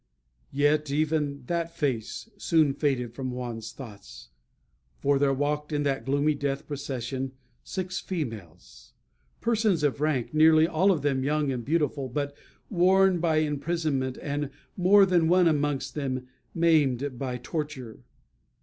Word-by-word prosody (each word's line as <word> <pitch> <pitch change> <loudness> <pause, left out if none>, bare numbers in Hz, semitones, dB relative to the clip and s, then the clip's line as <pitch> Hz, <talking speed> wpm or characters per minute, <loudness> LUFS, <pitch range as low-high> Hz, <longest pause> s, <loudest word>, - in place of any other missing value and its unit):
Yet 145 +1 +2
even 145 -1 0
that 170 +2 -2
face 125 - -2
soon 160 -7 +2
faded 130 -5 -1
from 130 +1 -4
Juan's 120 -3 -5
thoughts. 100 - -11 0.7
For 140 0 +2
there 140 -1 +3
walked 145 +2 -1
in 145 -1 0
that 135 -5 -1
gloomy 145 +3 +2
death 140 -1 -3
procession 135 -2 -4 0.3
six 185 -1 -4
females 110 - -7 0.5
persons 220 -8 +1
of 145 -1 0
rank; 150 -5 0
nearly 155 +1 +6
all 180 +4 +2
of 155 -7 -1
them 135 -2 +1
young 150 0 +1
and 125 -2 -3
beautiful, 145 -2 0
but 145 +2 -3 0.3
worn 190 -1 +4
by 165 -2 +1
imprisonment, 150 -3 -1
and 145 -1 -2 0.3
more 195 +2 +6
than 175 -3 +3
one 180 +1 +5
amongst 145 -3 0
them 130 -3 -3 0.3
maimed 145 -6 +2
by 125 -2 -3
torture. 135 -3 -5
145 Hz, 135 wpm, -27 LUFS, 130-160 Hz, 0.7 s, nearly